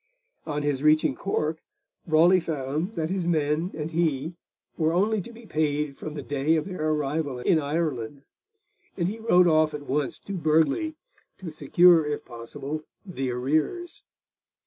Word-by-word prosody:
On 150 -1 -2
his 145 -2 0
reaching 155 +1 +4
Cork, 160 -5 -2 0.5
Raleigh 170 +4 +5
found 155 +4 -3
that 160 +1 -2
his 185 -3 -1
men 155 +1 +1
and 155 +1 -4
he 160 -1 0 0.4
were 160 0 +1
only 205 +4 +2
to 235 - -10
be 235 0 -14
paid 150 -4 -1
from 155 +1 -7
the 145 - -5
day 145 +3 +1
of 155 - 0
their 180 -5 -2
arrival 150 -2 -1
in 155 +6 +2
Ireland, 145 -4 -2 0.7
and 170 -2 0
he 215 +4 -4
wrote 180 -5 +4
off 155 -2 +3
at 145 -1 -7
once 140 0 -1
to 200 - -8
Burghley 160 - +1 0.4
to 180 -4 -7
secure, 165 +3 +5
if 150 0 -3
possible, 130 +6 -6 0.2
the 135 -9 -3
arrears. 155 - -1
155 Hz, 155 wpm, -26 LUFS, 145-175 Hz, 0.7 s, Raleigh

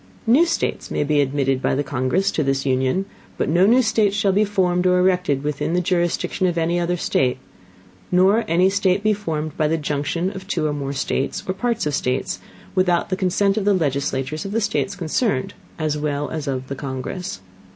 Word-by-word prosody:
New 270 +10 +5
States 330 - -2
may - - 0
be 145 0 +2
admitted 135 -1 0
by - - +1
the 145 - 0
Congress 135 +10 0
into 155 - 0
this 135 0 0
Union; 130 +8 +1 0.3
but - - 0
no 175 +5 +4
new 250 +4 +5
States 215 -3 +2
shall 200 -1 +2
be 205 +3 +3
formed 185 -3 +1
or 180 0 +4
erected 180 -6 +2
within 150 +2 -2
the - - +3
Jurisdiction 180 +1 0
of 175 -1 -1
any 170 +1 +1
other 175 +1 0
State; 130 -6 +1 0.7
nor 190 +5 +4
any 175 +3 +3
State 195 0 +1
be 215 0 +3
formed 155 -7 -4
by 155 - +2
the 160 +2 +1
Junction 150 +4 -2
of 190 -1 -9
two 165 -6 -1
or 150 - 0
more 140 -1 -3
States, 135 0 -2
or 185 - 0
Parts 235 +1 -1
of 150 - -1
States, 130 -1 -1 0.3
without 180 -2 +2
the 185 - 0
Consent 195 +2 +1
of 205 - 0
the 205 -1 +4
Legislatures 140 -1 -1
of 200 0 -5
the 225 - +2
States 200 -1 -1
concerned 180 - -1 0.2
as 155 -2 -1
well 145 -1 -2
as 155 -3 -4
of 130 -1 -3
the 140 - -4
Congress. 135 - -5
175 Hz, 205 wpm, -21 LUFS, 145-195 Hz, 0.7 s, New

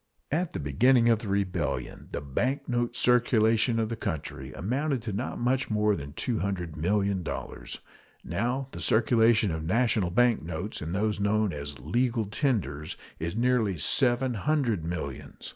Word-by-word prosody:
At 165 +3 0
the - - -3
beginning 115 - +4
of 115 -2 +4
the 110 - -7
rebellion 95 -3 -2
the - - -3
bank 125 - -1
note 120 -1 -1
circulation 115 -2 +3
of 110 -1 0
the 115 - -2
country 70 - -4
amounted 130 - -1
to 110 -3 -4
not 115 +6 -3
much 130 +2 +1
more 105 -1 +2
than 70 -3 -7
$200,000,000; 95 -2 -2 0.4
now 120 +10 -1
the - - -7
circulation 115 -2 +3
of 80 -1 -3
national 110 +1 +2
bank 120 +5 +3
notes 90 +5 -5
and 80 +4 -3
those 105 0 0
known 100 0 +1
as 70 -1 -5
"legal 120 -2 0
tenders" 95 - -1 0.2
is 85 +4 -3
nearly 115 -5 +2
seven 125 - +2
hundred 120 - 0
millions. 80 -5 -5
110 Hz, 145 wpm, -28 LUFS, 90-120 Hz, 0.4 s, beginning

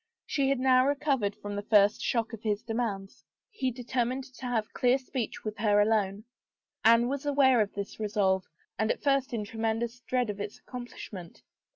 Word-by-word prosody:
She 275 -2 +1
had 275 -2 +1
now 255 0 +4
recovered 275 -8 0
from 205 0 -6
the 205 - -2
first 205 0 +4
shock 230 -1 0
of 220 - -7
his 210 -2 -1
demands. 220 -4 -3 0.3
He 270 -11 -1
determined 250 +1 -2
to 260 -1 -9
have 225 -3 -1
clear 250 +1 +3
speech 260 -3 -5
with 215 -1 -5
her 210 -1 +3
alone. 205 -1 +1 0.6
Anne 230 +1 +6
was 280 +2 -2
aware 275 -4 +4
of 205 - -1
this 200 +1 -5
resolve 200 -3 +1 0.4
and 220 +1 +1
at - - -1
first 275 -2 +2
in 220 -3 -2
tremen 225 0 -1
dous 235 +1 -4
dread 250 -2 -1
of 205 - -10
its 205 0 -5
accomplishment. 220 -8 -9
230 Hz, 185 wpm, -29 LUFS, 210-255 Hz, 0.6 s, Anne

